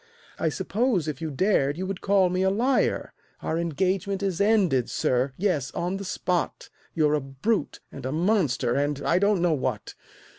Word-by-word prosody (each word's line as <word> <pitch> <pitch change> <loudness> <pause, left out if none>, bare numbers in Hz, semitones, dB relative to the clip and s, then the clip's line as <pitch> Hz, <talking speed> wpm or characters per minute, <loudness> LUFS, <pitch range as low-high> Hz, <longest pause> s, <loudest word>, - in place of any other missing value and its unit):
"I - - +1
suppose, 215 - 0
if 150 -2 -4
you 160 - -2
dared, 145 -2 +1
you 185 - -3
would 190 -1 -5
call 195 -2 +3
me 185 +1 0
a 190 - +3
liar. 245 +7 +1 0.3
Our 160 - -1
engagement 190 +4 -1
is 195 -1 -1
ended, 195 - +3
sir 130 +2 0
yes, 175 -9 0
on 180 +3 -1
the 200 - -6
spot; 180 -2 -2 0.2
You're 150 -2 +3
a 150 - +1
brute, 135 - -2
and - - -9
a - - -3
monster, 155 - +1
and 145 +1 0
I 175 - +3
don't 200 -2 +2
know 175 -2 +3
what." 130 -7 -3
175 Hz, 180 wpm, -26 LUFS, 145-195 Hz, 0.3 s, call